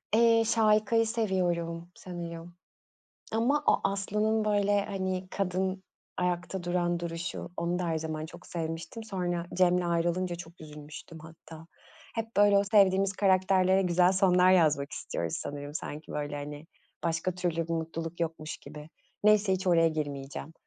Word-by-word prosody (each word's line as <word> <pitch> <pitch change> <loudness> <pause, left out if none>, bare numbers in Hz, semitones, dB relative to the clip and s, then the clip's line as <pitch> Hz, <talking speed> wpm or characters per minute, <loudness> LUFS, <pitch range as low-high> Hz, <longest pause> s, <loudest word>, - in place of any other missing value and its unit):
Eee, 230 0 +5
Şahika'yı 220 0 +3
seviyorum 175 -6 -1
sanıyor, 170 -2 -7 0.9
ama 240 +7 +2
o - - +4
Aslı'nın, 210 +3 0
böyle, 205 -1 +2
hani, 190 -2 -3
kadın, 190 0 -1 0.3
ayakta 180 +1 -2
duran 175 -1 0
duruşu, 170 +1 -4
onu 175 +1 -1
da, 180 - -2
her 160 -1 0
zaman 155 0 -4
çok 175 +2 -13
sevmiştim. 165 +6 -5
Sonra, 175 -4 -2
Cem'le 180 0 +4
ayrılınca 175 +1 0
çok 170 0 -11
üzülmüştüm 150 +1 -10
hatta. 160 0 -13 0.5
Hep 225 -1 -4
böyle, 205 0 +6
o 200 - +2
sevdiğimiz 195 -2 +4
karakterlere, 190 -1 +3
güzel 180 0 +3
sonlar 185 -1 +4
yazmak 150 -5 +3
istiyoruz 85 -1 -4
sanırım, 145 +1 -6
sanki, 150 0 -6
böyle, 145 0 -3
hani, 145 +1 -7 0.4
başka 165 +2 -1
türlü 175 -2 -1
bir - - -2
mutluluk 165 +1 -4
yokmuş 160 -2 -3
gibi, 150 0 -11 0.4
neyse 210 -2 +5
hiç 190 0 -2
oraya 165 -2 +5
girmeyeceğim, 145 -1 -5
180 Hz, 140 wpm, -29 LUFS, 165-195 Hz, 0.9 s, böyle